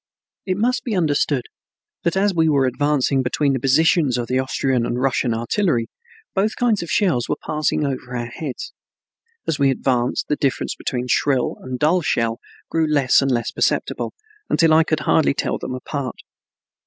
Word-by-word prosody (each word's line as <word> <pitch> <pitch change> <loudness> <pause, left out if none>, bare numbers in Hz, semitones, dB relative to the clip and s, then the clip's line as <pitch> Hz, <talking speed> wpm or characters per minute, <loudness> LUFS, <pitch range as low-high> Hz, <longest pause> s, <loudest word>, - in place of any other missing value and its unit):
It 185 0 0
must 245 +4 +1
be 235 -6 -2
understood 145 -6 +1 0.6
that 170 +2 0
as 200 0 +2
we 160 -2 +3
were 140 -3 +3
advancing 140 0 +1
between 135 +3 +1
the 130 - -1
positions 140 0 +3
of 120 - -2
the 130 +2 0
Austrian 130 -1 0
and 120 +1 -2
Russian 130 -2 +1
artillery, 120 - 0 0.4
both 210 +3 0
kinds 235 -4 +1
of 170 - -6
shells 170 - +1
were - - +1
passing 150 -1 0
over 130 -2 -4
our 120 - -3
heads. 130 +3 -6 0.7
As 155 - -1
we 140 -1 +4
advanced 125 -2 0
the 150 - 0
difference 135 -2 -1
between 125 -1 -3
shrill 130 0 +1
and 130 0 -5
dull 160 +7 +2
shell 115 -6 0 0.3
grew 160 -1 +1
less 140 -4 +4
and 135 - 0
less 120 -2 0
perceptible, - - -1 0.3
until 165 -2 +4
I 160 +1 +6
could 155 -1 -1
hardly 150 -3 +2
tell - - -1
them 130 - -4
apart. 130 0 -4
140 Hz, 175 wpm, -21 LUFS, 125-160 Hz, 0.7 s, I